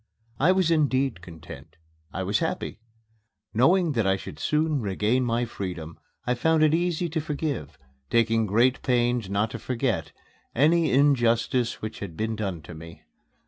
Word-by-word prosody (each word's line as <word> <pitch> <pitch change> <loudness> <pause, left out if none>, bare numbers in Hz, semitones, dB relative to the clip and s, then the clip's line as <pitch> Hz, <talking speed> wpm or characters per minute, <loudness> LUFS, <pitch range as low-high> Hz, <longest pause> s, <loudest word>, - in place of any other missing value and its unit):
I 160 +6 +5
was 185 -3 +2
indeed 135 - +1
content 80 -2 -12 0.4
I - - -3
was - - 0
happy. - - -3 0.7
Knowing 165 - +3
that 115 -7 0
I 95 - +3
should - - -9
soon 150 -2 +1
regain 105 +5 0
my 120 0 0
freedom, 90 -7 -6 0.3
I 125 - +1
found 160 +5 +2
it 155 0 +4
easy 175 0 0
to 160 0 -2
forgive 145 - -4 0.3
taking 115 -1 +2
great 120 +6 +2
pains 120 -4 +1
not 105 +3 0
to - - -6
forget 115 - -2 0.4
any 160 +4 +3
injustice 120 -3 +2
which 110 0 -5
had 85 -6 -7
been 110 +1 -1
done 95 -7 -4
me. 85 +1 -11
120 Hz, 150 wpm, -26 LUFS, 105-150 Hz, 0.7 s, I